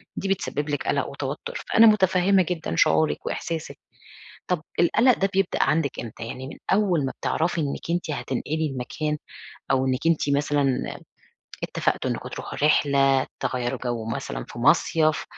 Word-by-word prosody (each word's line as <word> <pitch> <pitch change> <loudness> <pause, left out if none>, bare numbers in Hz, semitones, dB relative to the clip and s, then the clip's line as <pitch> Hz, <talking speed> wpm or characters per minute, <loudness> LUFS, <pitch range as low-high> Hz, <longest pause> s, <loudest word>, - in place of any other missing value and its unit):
دي 195 - -3
بتسبب 145 -5 -1
لك 145 - -2
قلق - - +1
وتوتر. 485 +1 -5
فأنا 225 0 +7
متفهمة 190 -2 +4
جدًا 170 -3 -3
شعورِك 155 - +2
وإحساسِك. 165 -2 -4 0.7
طَب 180 -4 -1 0.2
القلق 235 +8 +4
ده 195 - +2
بيبدأ 195 0 +1
عندِك 155 -3 +1
إمتى؟ 115 0 -7
يعني 130 +3 -6
من 140 - -8 0.2
أول 190 -7 +2
ما - - -3
بتعرفي 165 +1 0
إنِك 145 +2 -3
أنتِ 170 -2 -1
هتنقلي 145 +4 -2
المكان 150 +4 -3 0.5
أو 135 0 +2
إنِك 130 +5 -1
أنتِ 165 -3 +2
مثلًا 140 -2 0 0.6
اتفقتوا - - -1
إنكم - - -4
تروحوا - - -7
رحلة، 135 -3 +3 0.2
تغيّروا 125 -1 -1
جو 120 -2 -2
مثلًا 115 - -4
في - - -9
مصيف، 155 +3 +3
150 Hz, 150 wpm, -24 LUFS, 135-175 Hz, 0.7 s, فأنا